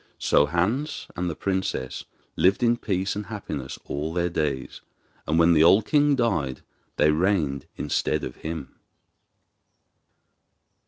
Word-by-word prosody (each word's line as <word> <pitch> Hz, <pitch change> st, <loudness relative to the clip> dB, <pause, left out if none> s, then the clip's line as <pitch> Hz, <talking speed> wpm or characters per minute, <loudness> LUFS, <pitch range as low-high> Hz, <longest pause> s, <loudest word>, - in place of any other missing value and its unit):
So 75 Hz, -, +3 dB
Hans 105 Hz, -, -1 dB
and 90 Hz, 0 st, -2 dB
the 80 Hz, -, -4 dB
princess 95 Hz, -10 st, -2 dB, 0.3 s
lived 95 Hz, +8 st, +3 dB
in 120 Hz, 0 st, +4 dB
peace 95 Hz, -4 st, -2 dB
and 105 Hz, -1 st, -5 dB
happiness 75 Hz, -11 st, -6 dB
all 75 Hz, +3 st, -3 dB
their 90 Hz, 0 st, 0 dB
days, 70 Hz, -5 st, -2 dB, 0.5 s
and 80 Hz, +2 st, +1 dB
when 85 Hz, +1 st, +5 dB
the 80 Hz, -1 st, +5 dB
old 95 Hz, +6 st, +6 dB
king 145 Hz, -1 st, +3 dB
died 85 Hz, -, 0 dB, 0.3 s
they 75 Hz, +1 st, +4 dB
reigned 80 Hz, -5 st, 0 dB
instead 75 Hz, -, -1 dB
of -, -, -6 dB
him. 80 Hz, -4 st, -6 dB
85 Hz, 130 wpm, -25 LUFS, 75-100 Hz, 0.5 s, old